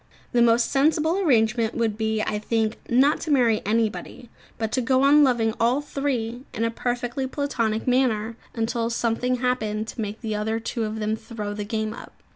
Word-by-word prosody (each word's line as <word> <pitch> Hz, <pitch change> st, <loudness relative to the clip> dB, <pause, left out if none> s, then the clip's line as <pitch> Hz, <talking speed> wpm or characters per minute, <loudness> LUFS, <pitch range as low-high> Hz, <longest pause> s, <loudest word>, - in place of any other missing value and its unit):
The 240 Hz, -, +3 dB
most 235 Hz, 0 st, +4 dB
sensible 315 Hz, +5 st, +2 dB
arrangement 230 Hz, -, +2 dB
would 225 Hz, -3 st, 0 dB
be, 220 Hz, 0 st, -1 dB
I 210 Hz, -, -2 dB
think, 220 Hz, 0 st, -1 dB
not 270 Hz, +6 st, +4 dB
to 320 Hz, -, -5 dB
marry 240 Hz, -6 st, +3 dB
anybody, 225 Hz, +2 st, -2 dB, 0.3 s
but 220 Hz, -2 st, -2 dB
to 260 Hz, -, +1 dB
go 260 Hz, +2 st, +2 dB
on 290 Hz, +2 st, +6 dB
loving 235 Hz, -5 st, +2 dB
all 240 Hz, +4 st, +3 dB
three 260 Hz, -5 st, -3 dB
in 225 Hz, -, -1 dB
a 230 Hz, -, +1 dB
perfectly 245 Hz, +2 st, -2 dB
platonic 235 Hz, -6 st, -1 dB
manner 235 Hz, -3 st, +1 dB, 0.2 s
until 230 Hz, 0 st, -1 dB
something 235 Hz, +2 st, 0 dB
happened 220 Hz, -4 st, -1 dB
to 230 Hz, -, -5 dB
make 210 Hz, +1 st, -4 dB, 0.4 s
two 230 Hz, -1 st, -2 dB
of 215 Hz, +1 st, -4 dB
them 215 Hz, 0 st, 0 dB
throw 215 Hz, -2 st, -6 dB
the 205 Hz, 0 st, -4 dB
game 220 Hz, 0 st, -2 dB
up. -, -, -11 dB
230 Hz, 175 wpm, -24 LUFS, 220-255 Hz, 0.4 s, on